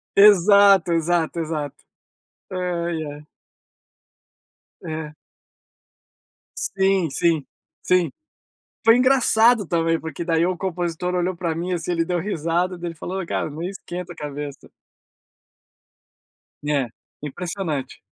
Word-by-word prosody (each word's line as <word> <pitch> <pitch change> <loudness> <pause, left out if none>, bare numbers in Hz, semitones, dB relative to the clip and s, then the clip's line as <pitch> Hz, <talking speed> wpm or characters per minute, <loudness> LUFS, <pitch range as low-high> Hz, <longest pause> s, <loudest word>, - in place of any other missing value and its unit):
Exato, 200 -2 +7
exato, 170 0 +1
exato. 155 -3 -3 0.8
Ai, 170 -3 -2
é. 150 0 -9 1.6
É. 155 -1 -5 1.6
Sim, 190 -2 +3
sim, 160 -1 +1 0.4
sim. 180 -2 +3 0.8
Foi 225 +1 +7
engraçado 245 -3 +4
também, 165 -1 +1
porque 160 +1 -5
daí 165 -1 +2
o 180 0 0
compositor 180 -1 -2
olhou 180 0 0
para 170 -2 -2
mim, 175 +3 -3
assim, 175 0 -2
ele 165 -1 +1
deu 180 0 -1
risada, 175 0 -1
daí 175 0 -5
ele 165 - -8
falou: 190 +2 -4
"Ô 170 - -7
cara, - - -1
não 155 +3 -7
esquenta 180 -1 -6
a - - -16
cabeça". 145 -1 -7 2.0
É, 140 -4 +1 0.3
impressionante. 160 0 -4
170 Hz, 110 wpm, -23 LUFS, 160-185 Hz, 2.0 s, Exato